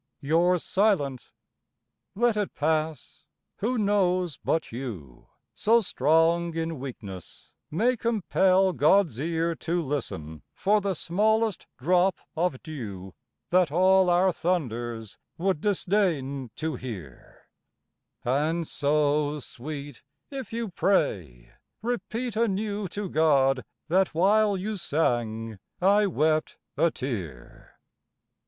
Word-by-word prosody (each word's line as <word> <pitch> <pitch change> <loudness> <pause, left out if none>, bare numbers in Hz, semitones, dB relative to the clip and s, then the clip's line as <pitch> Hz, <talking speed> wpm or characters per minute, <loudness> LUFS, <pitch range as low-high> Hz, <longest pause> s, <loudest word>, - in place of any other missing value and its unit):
You're 170 +5 +3
silent! 175 - 0 0.9
let 235 +1 +2
it 205 -2 -2
pass; 155 0 -2 0.3
who 245 +5 -1
knows 185 -5 +1
but 160 - 0
you, 110 - -7 0.3
So 230 +2 +3
strong 165 - +2
in 165 -2 -3
weakness, 105 -9 -9 0.2
may 235 +11 +2
compel 190 -4 +2
God's 155 - +3
ear 165 +2 0
To 170 +1 -1
listen 80 - -4
for 210 +2 +2
the 195 -1 -1
smallest 215 +5 +1
drop 180 +6 +2 0.2
of 165 -5 -1
dew 100 - -7 0.4
That 180 -4 +4
all 185 +2 +4
our 180 +2 +4
thunders 120 - -3 0.2
would 185 -3 0
disdain 170 - 0
to 160 0 -2
hear: 95 - -10 0.8
And 155 +6 0
so, 150 0 +1
Sweet, 145 +2 -8 0.3
if 270 -2 -6
you 230 -1 -3
pray, 90 - 0 0.3
repeat 235 +1 -3
anew 210 -2 -1
To 205 +3 -5
God, 140 -5 +3 0.2
that 185 0 +2
while 205 +3 +3
you 210 +3 -3
sang 115 - -1 0.2
I 200 +3 +4
wept 155 -3 +1 0.2
a 170 - +3
tear! 95 - -7
165 Hz, 105 wpm, -27 LUFS, 135-195 Hz, 0.9 s, That